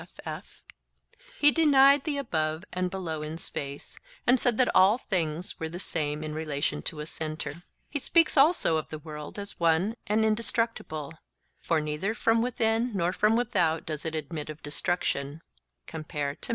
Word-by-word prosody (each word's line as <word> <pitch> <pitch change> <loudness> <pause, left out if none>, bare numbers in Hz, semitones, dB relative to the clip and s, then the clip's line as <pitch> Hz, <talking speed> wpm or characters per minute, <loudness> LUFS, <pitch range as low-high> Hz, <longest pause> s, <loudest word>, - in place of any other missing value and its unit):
he 295 0 +6
denied 280 -3 +5
the 300 -3 -1
above 160 - -1
and 180 0 0
below 175 -5 -4
in 155 +1 -5
space, 140 -4 -6 0.3
and 250 +1 +5
said 240 -2 +2
that 255 - +4
all 195 +5 +6
things 175 -7 -2
were 160 - -3
the 175 +2 -7
same 150 -4 -2
in 155 0 -4
relation 145 - -2
to 150 - -4
a - - -5
centre. 160 +2 -5 0.3
He 290 - -3
speaks 330 +4 +3
also 280 - +4
of 155 - -4
the 155 - -5
world 150 +1 -8
as 200 0 -6
one 170 +6 +2
and 220 +1 +2
indestructible: 220 - 0 0.5
'for 165 - +1
neither 155 +8 -2
from 225 0 +2
within 230 -1 +1
nor 175 0 +1
from 215 +3 +3
without 170 -9 +1
does 155 -2 -4
it 160 -1 -3
admit 155 0 -5
of 155 0 -9
destruction' 145 -1 -2 0.4
(Tim). 160 - -7
170 Hz, 160 wpm, -28 LUFS, 155-225 Hz, 0.5 s, he